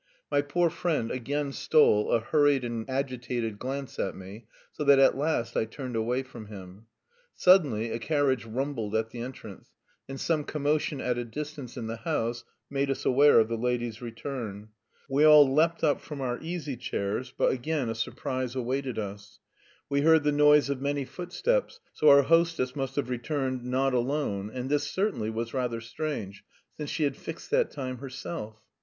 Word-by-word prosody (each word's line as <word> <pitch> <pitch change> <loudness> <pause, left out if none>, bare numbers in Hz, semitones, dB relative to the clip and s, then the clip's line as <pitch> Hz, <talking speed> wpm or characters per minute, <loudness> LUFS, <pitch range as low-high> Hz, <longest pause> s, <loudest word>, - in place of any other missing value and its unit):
My 145 0 +3
poor 165 +4 +1
friend 150 -11 -1
again 140 +3 -2
stole 135 -8 +3
a - - +3
hurried 145 +2 +2
and 120 0 -4
agitated 125 -5 -2
glance 135 +1 -5
at 95 - -1
me, 100 +4 -11 0.2
so - - -4
that 140 -1 +6
at 135 - +5
last 135 -5 -1
I - - +1
turned 125 +2 -7
away 120 +4 0
from 120 -4 -11
him. 100 +1 -11 0.5
Suddenly 140 - +4
a 115 - -2
carriage 140 -1 +1
rumbled 115 -2 -3
at 110 0 0
the 120 - -8
entrance, 115 -6 -8 0.4
and 135 0 -6
some 155 -3 0
commotion 150 -1 -1
at 125 -1 -1
a - - -2
distance 145 +1 -7
in 115 - -4
the 115 +1 -4
house 120 -6 -2 0.2
made 140 0 -1
us 135 - -2
aware 140 0 +6
of 110 - +3
the 115 0 -3
lady's 120 -2 -2
return. 115 -3 -6 0.4
We 140 +1 +2
all 150 -2 +9
leapt 160 +5 +2
up 150 -3 +2
from 150 -3 -8
our 125 -2 -2
easy 160 -5 -4
chairs, 115 +1 -3
but - - +3
again 135 +1 -1
a 115 - -1
surprise 125 +2 -3
awaited 130 0 -2
us; 100 -1 -6 0.5
we 140 0 +1
heard 160 0 +5
the 150 - +2
noise 150 0 +5
of 135 -1 -3
many 140 0 -1
footsteps, 185 - -2
so 155 - +4
our 140 0 +8
hostess 165 -4 +2
must 135 -2 -3
have 140 -3 -1
returned 130 0 -2
not 130 +2 0
alone, 120 -6 -1
and 125 +1 -4
this 145 +1 +1
certainly 185 - -1
was 115 +1 -4
rather 125 -3 -1
strange, 115 -5 -5 0.3
since 150 -2 -5
she 155 - -1
had 140 -2 +1
fixed 165 - -8
that 480 0 +3
time 130 -3 -5
herself. 130 -4 -7
130 Hz, 180 wpm, -28 LUFS, 115-145 Hz, 0.5 s, all